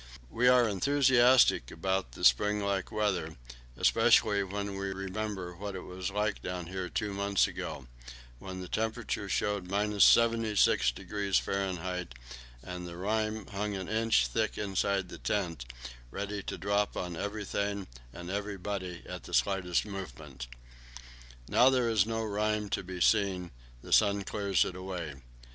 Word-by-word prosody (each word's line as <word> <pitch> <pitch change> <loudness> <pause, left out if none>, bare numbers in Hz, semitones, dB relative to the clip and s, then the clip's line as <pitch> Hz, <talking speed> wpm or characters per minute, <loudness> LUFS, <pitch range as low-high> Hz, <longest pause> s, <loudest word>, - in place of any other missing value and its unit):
We 125 +2 +2
are 125 -2 +6
enthusiastic 125 - +4
about 95 -6 -2
the - - -2
spring 105 +13 +4
like 100 -2 -1
weather, 95 -7 -1 0.4
especially 100 -1 +4
when 100 +1 -4
we 100 0 -2
remember 95 -1 -4
what 100 +2 -6
it 95 - -6
was 90 0 -5
like 105 +1 -1
down 90 -1 -4
here 90 +1 -5
two 105 -2 -2
months 100 0 +2
ago, - - -6 0.5
when 95 -1 -7
the 90 - -7
thermometer 110 -2 -2
showed 100 0 -1
76° 105 - +3
F., 90 -2 -2 0.6
and 90 +1 -6
the 85 0 -8
rime 110 +2 -1
hung 105 0 -3
an 95 -1 -5
inch 110 - +2
thick - - -1
inside 100 -2 0
the - - -9
tent, 85 - -2 0.4
ready 100 +6 -4
to - - -5
drop 100 +1 0
on 90 -1 -3
everything 100 0 -3 0.3
and 90 +7 -7
everybody 100 -3 -4
at - - -7
the - - -3
slightest 90 -3 +1
movement. 80 - -8 1.0
Now 125 - +5
there 130 -2 +2
is 110 -3 +3
no 115 0 -2
rime 105 0 -1
to - - -1
be 90 -1 -7
seen; 95 -4 +2 0.3
the - - -3
sun 100 -2 +4
clears 100 -2 +1
it 90 - -5
away. 90 -5 -5
100 Hz, 145 wpm, -30 LUFS, 90-105 Hz, 1.0 s, are